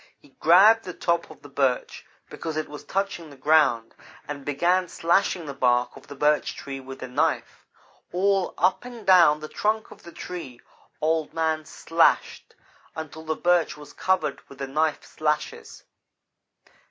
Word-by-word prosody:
He 145 - -22
grabbed 205 +7 +6
the 180 - -7
top 170 -1 0
of 155 -2 -15
the - - -10
Birch 135 -2 -1 0.2
because 160 -2 -6
it 155 - -2
was 150 0 -10
touching 195 -4 -3
the 140 - -13
ground, 145 -5 +3 0.3
and 145 -1 -6
began 175 +6 +1
slashing 170 +1 +1
the 140 - -6
bark 125 -2 +1
of - - -14
the 145 - -9
Birch 150 +2 +1
Tree 135 -1 -7
with 135 0 -9
the 130 - -5
knife. 150 +6 -1 0.4
All 195 +1 +1
up 185 +6 +2
and 245 -3 -10
down 170 -5 +6
the 155 - -6
trunk 215 +6 -1
of - - -14
the 170 - -12
tree 165 -8 -8 0.4
Old 160 0 0
man 160 -1 0
slashed, 165 +2 +1 0.4
until 160 0 -7
the 160 0 -1
Birch 175 -2 +1
was 150 -1 -12
covered 160 -7 0
with 140 - -13
the 135 - -4
knife 150 +2 0
slashes. 150 -1 -3
155 Hz, 165 wpm, -25 LUFS, 145-175 Hz, 0.4 s, grabbed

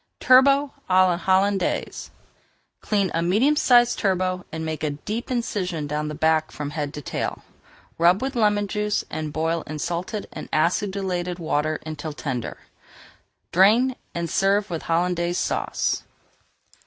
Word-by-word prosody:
TURBOT 275 +2 +5 0.2
À 185 0 +6
LA 180 - +2
HOLLANDAISE 190 +2 0 0.7
Clean 200 -3 0
a 165 - 0
medium 215 - +3
sized 245 -4 +4
turbot 185 -2 0
and 160 0 -4
make 155 -1 -4
a 155 - +1
deep 210 - -5
incision 190 - -2
down 150 +1 -2
the 150 - -5
back 160 0 +2
from 145 -1 -5
head 145 -1 -3
to 150 - -7
tail. - - -4 0.6
Rub 175 +3 +5
with 265 +2 -3
lemon 210 -3 +2
juice 210 +1 -1
and 155 -1 -4
boil 160 +2 -1
in 155 - -5
salted 175 +6 -3
and - - -8
acidulated 180 +1 0
water 155 -2 -1
until 155 0 -5
tender. 130 -5 -4 0.9
Drain 225 +8 +4 0.2
and 170 0 -2
serve 195 +3 +1
with 165 - -3
Hollandaise 175 +1 +1
Sauce. - - -1
180 Hz, 140 wpm, -23 LUFS, 160-205 Hz, 0.9 s, À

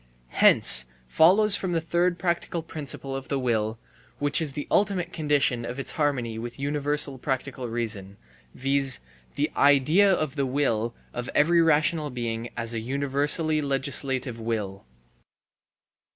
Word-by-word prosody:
Hence 60 0 +6 0.2
follows 195 - +4
the 175 -3 -1
third 175 +2 0
practical 170 -1 -2
principle 140 -3 -5
of 135 -1 -6
the 140 - -1
will, 115 -3 -1 0.4
which 145 +2 +1
is 150 -4 -3
the 145 +1 -5
ultimate 190 -4 0
condition 145 -6 0
of 120 +2 -6
its 135 - -4
harmony 130 -7 -1
with 120 +1 -7
universal 145 -1 -1
practical 130 -1 -4
reason, 105 -4 -4 0.4
viz.: 135 -1 0 0.3
the - - -1
idea 150 +8 +4
of 155 -6 -1
the 140 - +1
will 120 -4 -1 0.2
of 120 0 -5
every 170 +3 +4
rational 155 -1 +2
being 120 -2 -4
as 115 0 -3
a 115 - -2
universally 140 +5 0
legislative 135 -3 -1
will. 105 - -4
140 Hz, 135 wpm, -25 LUFS, 120-155 Hz, 0.4 s, Hence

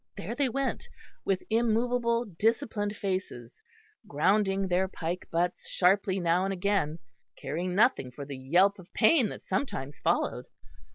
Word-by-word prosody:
There 210 - -4
they 275 +1 +1
went, 275 +3 -2 0.4
with 190 -1 0
immovable 235 +1 +1
disciplined 210 +1 -1
faces, 185 - -4 0.5
grounding 195 +5 +2
their 185 +1 +1
pike 175 -1 -5
butts 175 +2 -1
sharply 190 +1 +2
now 175 +1 +2
and 195 - -1
again, 190 -5 0 0.4
caring 170 +6 -3
nothing 215 - +3
for 135 +3 -8
the 140 0 -7
yelp 175 +10 +2
of 180 - -14
pain 240 0 +4
that - - -9
sometimes 150 - -3
followed. - - 0
195 Hz, 135 wpm, -29 LUFS, 170-220 Hz, 0.5 s, pain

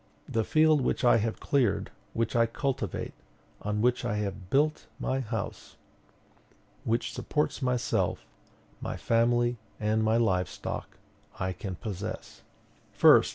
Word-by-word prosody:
The 115 - 0
field 155 +3 +4
which 130 - 0
I 120 - +7
have 110 0 -1
cleared, 135 -4 +1 0.2
which 115 0 -1
I 115 0 +5
cultivate, 135 +3 -2 0.5
on 105 0 -1
which 125 0 +2
I 105 - -1
have 100 -3 -3
built 150 +5 +2
my 130 - 0
house, 110 -5 -5 1.1
which 115 +2 0
supports 150 -1 -1
myself, 125 -2 0 0.6
my - - -3
family, 120 +1 +2 0.2
and 110 +1 +1
my 110 +1 +3
livestock, 95 -7 -1 0.4
I 95 0 -1
can 95 0 -5
possess: 100 +1 -6 0.6
1st. - - +7
115 Hz, 125 wpm, -29 LUFS, 105-125 Hz, 1.1 s, I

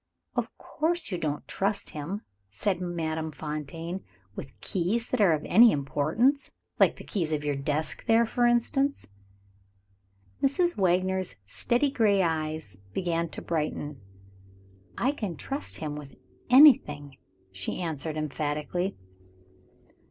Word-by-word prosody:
"Of - - 0
course 335 -2 -2
you 180 - -2
don't 150 -2 -3
trust 200 +1 -1
him," 165 +8 -4 0.3
said 185 - -1
Madame 160 -3 -2
Fontaine, 160 +4 -5 0.3
"with - - -9
keys 205 +6 -1
that 255 - 0
are 185 -5 +6
of 150 - -2
any 230 +4 +7
importance; 155 - +1 0.3
like - - +5
the - - -10
key 200 - -2
of 150 - -4
your 145 -1 0
desk 145 +3 -2
there, 230 +1 +5
for 240 +2 +2
instance." 270 +4 +1 1.3
Mrs. 345 +6 +2
Wagner's 185 0 +1
steady 240 - +1
gray 205 -7 +3
eyes 155 - -2
began 170 -2 0
to - - -7
brighten. 150 -4 -3 1.0
"I 260 - +2
can 210 - -4
trust 275 +2 -5
him 150 -2 -4
with 145 -2 -9 0.3
anything," 150 - +6 0.3
she 95 0 -4
answered 160 -2 -3
emphatically. 155 +5 -2
175 Hz, 125 wpm, -28 LUFS, 150-225 Hz, 1.3 s, any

